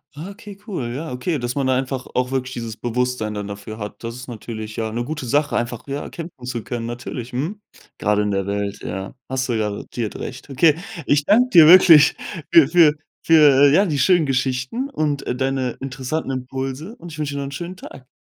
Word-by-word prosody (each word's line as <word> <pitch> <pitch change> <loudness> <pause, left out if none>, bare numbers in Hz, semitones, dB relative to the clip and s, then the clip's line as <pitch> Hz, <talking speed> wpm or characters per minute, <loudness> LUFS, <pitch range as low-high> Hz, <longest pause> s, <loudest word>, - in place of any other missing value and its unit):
Ah, 165 +7 -7
okay, 205 -1 -11
cool. 170 - -4
Ja, 160 0 -5
okay, 135 +6 -2
dass 120 -2 -3
man 140 -2 -1
da 130 -1 +2
einfach 130 -1 -3
auch 125 +1 0
wirklich 130 -1 -2
dieses 115 -2 -5
Bewusstsein 120 -3 -2
dann 105 -1 -4
dafür 100 +2 -8
hat. 105 +2 -8
Das 115 0 -5
ist 125 +1 -9
natürlich 110 -2 -7
ja 110 -1 -3
'ne 120 +2 -2
gute 150 -3 -5
Sache, 145 +3 +1
einfach 120 -1 -2
ja, 140 +1 -4
kämpfen 165 -7 -9
zu 120 -3 -4
können, 120 -2 -4
natürlich, 120 0 -6
mhm. 165 +12 -3 0.4
Grade 105 0 +2
in 105 - -1
der 95 0 -1
Welt, 100 0 -2
ja, 95 0 -5 0.2
hast 130 0 -1
du 115 - +1
garantiert 105 +1 -3
recht. 130 +2 -7
Okay, 150 +3 +4 0.3
ich 145 0 +2
danke 245 +7 +4
dir 165 -6 +8
wirklich 165 -4 +8 0.4
für 160 -5 +7
für 160 -1 +5 0.3
für, 145 -4 +6
äh, - - +4
ja, 195 +6 +5
die 150 -5 -1
schönen 175 +3 +4
Geschichten 130 - -1
und, 150 - -2
äh, 125 - -1
deine 130 -1 -1
interessanten 135 +2 -3
Impulse 135 - -5
und 170 -4 -11
ich 155 - -9
wünsche 145 -1 -2
dir 140 - -2
noch - - -3
'n 135 - -6
schönen 175 +6 -6
Tag. 130 -7 -12
130 Hz, 215 wpm, -21 LUFS, 120-155 Hz, 0.4 s, dir